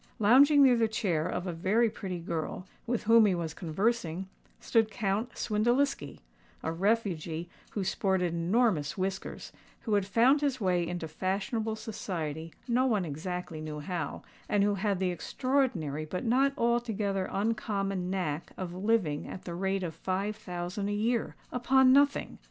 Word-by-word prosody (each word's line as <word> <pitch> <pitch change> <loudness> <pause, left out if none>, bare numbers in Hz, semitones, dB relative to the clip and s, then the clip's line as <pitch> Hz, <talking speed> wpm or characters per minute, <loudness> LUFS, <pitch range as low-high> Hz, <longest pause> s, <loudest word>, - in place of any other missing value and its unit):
Lounging 280 +7 +6
near 255 -2 +6
the 230 -1 +3
chair 180 -8 0
of 180 - -3
a 180 - -3
very 195 +8 +2
pretty 190 -4 -5
girl, 170 +1 -4 0.2
with 240 -1 -1
whom 225 0 +6
he 190 - +2
was 165 -3 -3
conversing, 190 +1 -1 0.3
stood 225 -2 +2
Count 215 +3 -1
Swindeliski—a 240 - -1
refugee 175 -3 -1 0.2
who 205 - -1
sported 185 -2 0
enormous 170 -3 +1
whiskers, 190 0 -4 0.3
who 220 - -2
had 200 -2 +2
found 250 +8 +4
his 275 -3 0
way 180 -4 +1
into 175 -2 -4
fashionable 200 +7 -2
society 165 -8 -5 0.2
no 255 +2 +2
one 210 -7 +1
exactly 165 +1 -5
knew 155 -1 -5
how, 160 0 -4 0.3
and 205 -1 +3
who 205 0 +3
had 200 0 0
the 185 -1 +1
extraordinary 175 - -1
but 180 +9 -4
not 265 +4 +3
altogether 220 -6 0
uncommon 195 -3 -1
knack 175 -5 -3
of 180 -2 -5
living 185 -6 0
at 185 - -8
the 175 - -6
rate 190 +2 -1
of 165 -2 -3
five 195 +5 -2
thousand 180 0 -4
a - - -1
year—upon 245 +4 +2
nothing! 285 +1 +2
195 Hz, 150 wpm, -30 LUFS, 175-230 Hz, 0.3 s, Lounging